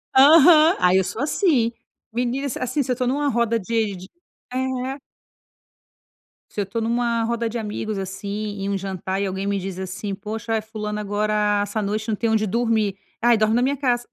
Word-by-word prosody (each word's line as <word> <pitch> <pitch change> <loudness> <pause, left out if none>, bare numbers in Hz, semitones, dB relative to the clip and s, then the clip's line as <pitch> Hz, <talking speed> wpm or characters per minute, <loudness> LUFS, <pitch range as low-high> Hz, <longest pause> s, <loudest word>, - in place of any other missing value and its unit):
Aham. 315 +4 +7
Aí 180 +1 +4
eu 190 - +3
sou 225 - -5
assim. 285 - +2 0.4
Menina, 250 +3 -1
assim 270 +4 -1
se 255 - -3
eu - - +4
estou 250 0 -1
numa 285 +2 +1
roda 230 -1 +1
de 215 -1 -1
de 185 +1 -10 0.5
É. 260 +1 -2 1.5
Se 210 - -2
eu - - +1
estou 210 +4 -4
numa 235 0 0
roda 235 0 -1
de 235 - -4
amigos, 215 -1 -4
assim, 200 +2 -4
em 195 - -2
um 200 - 0
jantar, 190 0 -3
e - - 0
alguém 190 +1 -3
me 200 -1 0
diz, 190 0 -5
assim: 190 +1 -4
"Poxa, 215 +3 -5
eh, 220 - 0
fulana, 210 -1 -5
agora, 210 0 +1
essa 205 +1 -3
noite, 215 +2 -2
não 215 - 0
tem 230 +2 -1
onde 215 -1 +2
dormir". 220 -2 +1 0.3
"Aí, 240 -1 +5
dorme 215 +1 +2
na 245 - +3
minha 270 +3 +1
casa". 245 -3 0
220 Hz, 195 wpm, -22 LUFS, 200-245 Hz, 1.5 s, Aham